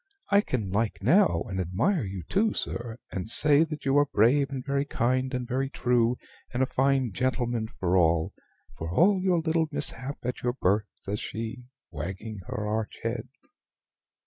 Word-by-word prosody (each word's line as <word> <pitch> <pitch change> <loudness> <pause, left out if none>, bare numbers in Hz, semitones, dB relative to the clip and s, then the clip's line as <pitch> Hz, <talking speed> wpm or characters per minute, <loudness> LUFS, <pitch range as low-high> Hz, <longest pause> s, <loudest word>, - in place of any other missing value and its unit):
I 200 0 +6
can 110 - -3
like 105 0 -1
now, 180 - +4
and 95 -1 -4
admire 115 - +1
you 95 -3 -5
too, 210 - +1
sir, 120 -1 -3
and 95 +3 -4
say 145 +4 +5
that 155 -3 -7
you 135 +1 +4
are 145 - +3
brave, 135 +4 +3
and 135 -2 -5
very 140 0 +1
kind, 130 -1 0
and 125 -2 -3
very 135 +2 -1
true, 125 -2 +1 0.3
and 125 +2 +1
a - - +3
fine 135 -2 +1
gentleman 120 0 -1
for 90 -4 -1
all 80 -2 +2 0.4
for 80 - -5
all 185 - +4
your 185 -2 +2
little 160 0 +1
mishap 135 -1 -1
at 125 +1 -3
your 120 0 0
birth," 105 -3 +1
says 105 +2 -5
she, 115 +3 -5 0.3
wagging 100 +3 -6
her 105 - -3
arch 110 0 -2
head. 115 +1 -2
125 Hz, 170 wpm, -27 LUFS, 105-140 Hz, 0.4 s, I